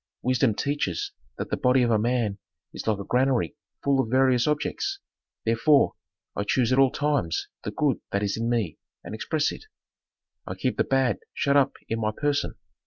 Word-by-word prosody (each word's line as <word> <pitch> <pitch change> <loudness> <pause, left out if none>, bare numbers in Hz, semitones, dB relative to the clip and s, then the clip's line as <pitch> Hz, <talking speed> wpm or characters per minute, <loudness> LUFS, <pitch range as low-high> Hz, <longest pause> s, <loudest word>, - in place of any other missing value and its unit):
"Wisdom 125 -3 +2
teaches 140 - -1 0.3
that - - -5
the - - +1
body 125 0 +3
of 120 - +2
a 110 - +3
man 115 -3 0 0.3
is - - -7
like 110 -2 +2
a 100 - -5
granary 125 - +1 0.3
full 140 -1 +2
of 125 -4 +1
various 130 0 +3
objects. 390 - -1 0.5
Therefore, 115 +6 +4 0.4
I 100 - -1
choose 125 +3 +2
at 130 - +3
all 135 -1 +6
times 140 - -1
the - - -3
good 135 +5 0
that 100 +1 0
is 100 -1 0
in 115 +1 -1
me 115 -9 -1 0.2
and - - -7
express 150 +7 0
it. - - -10 0.8
I - - -4
keep - - -1
the - - +3
bad 135 -4 +1 0.2
shut 140 0 +1
up 140 -2 +4
in 115 - -2
my 110 - +1
person. 145 -1 0
125 Hz, 185 wpm, -26 LUFS, 110-140 Hz, 0.8 s, all